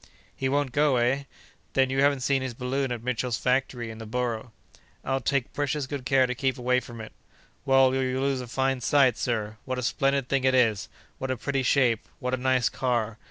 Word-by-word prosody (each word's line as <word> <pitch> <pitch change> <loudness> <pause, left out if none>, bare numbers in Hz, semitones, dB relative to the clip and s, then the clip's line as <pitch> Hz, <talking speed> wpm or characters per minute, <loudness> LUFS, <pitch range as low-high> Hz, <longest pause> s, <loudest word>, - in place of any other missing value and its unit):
"He 130 - -1
won't 140 -1 0
go, 145 0 +3
eh? 125 +3 +1 0.5
Then 130 -1 +2
you 135 0 +1
haven't 140 -1 +3
seen 135 +1 +1
his 130 -3 -4
balloon 130 +2 -2
at 120 -2 -4
Mitchell's 125 -1 -1
factory 125 -2 -1
in 110 - -10
the 110 - -8
Borough?" 120 0 -3 0.5
"I'll 135 0 0
take 140 -3 -1
precious 145 0 -1
good 130 -1 -6
care 130 -1 +4
to 125 - -2
keep 130 +1 -1
away 125 0 +2
from 120 -2 -10
it!" 110 - -8 0.5
"Well, 135 -1 +5
you'll 130 0 0
lose 135 -2 0
a 125 - -7
fine 130 +1 0
sight, 130 -2 +4
sir. 110 -4 -2
What 130 -1 -3
a 125 - -3
splendid 135 +1 +1
thing 135 -1 0
it 130 0 +3
is! 115 -5 +2 0.3
What 130 - -3
a 130 - -1
pretty 140 +3 -1
shape! 125 -3 +3 0.2
What 125 0 -3
a - - +2
nice 130 -2 +2
car! 115 -4 -1
130 Hz, 210 wpm, -26 LUFS, 120-135 Hz, 0.5 s, Well